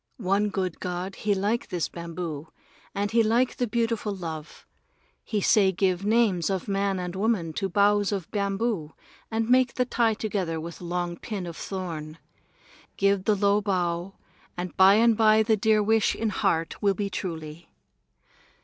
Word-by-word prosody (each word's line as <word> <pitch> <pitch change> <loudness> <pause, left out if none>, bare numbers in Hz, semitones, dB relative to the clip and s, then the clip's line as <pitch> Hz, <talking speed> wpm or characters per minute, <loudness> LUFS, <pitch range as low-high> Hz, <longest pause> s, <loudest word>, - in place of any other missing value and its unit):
One 205 -1 +1
good 185 -4 -3
god 180 +1 -4
he 205 0 0
like 205 +5 -1
this 175 -4 -2
bamboo, 170 -3 -6 0.5
and 200 +1 -1
he 230 0 +4
like 235 +3 +2
the 245 - 0
beautiful 230 -2 -1
love. 160 -4 -7 0.6
He 210 -2 -2
say 195 -1 +4
give 185 0 0
names 210 -5 +2
of 190 -3 -2
man 195 -1 0
and 180 0 -4
woman 195 -5 0
to 195 - -1
boughs 205 +2 +3
of 195 -5 -3
bamboo 200 -5 -2 0.3
and 225 0 -1
make 255 0 +3
the 250 - +1
tie 230 -3 +1
together 190 -7 -2
with 170 +2 -8
long 175 0 -3
pin 200 -2 -5
of 170 -1 -7
thorn. 165 -6 -6 0.8
Give 200 -1 +2
the 215 - +3
low 200 +1 +2
bow, 180 -2 -1 0.4
and 180 0 -5
by 190 +1 +7
and 230 +1 +4
by 220 0 +5
the 220 0 +3
dear 215 0 +2
wish 220 +1 +2
in 225 - -1
heart 165 -4 -1
will 200 -2 +2
be 200 0 -3
truly. 165 -3 -6
195 Hz, 165 wpm, -26 LUFS, 175-215 Hz, 0.8 s, by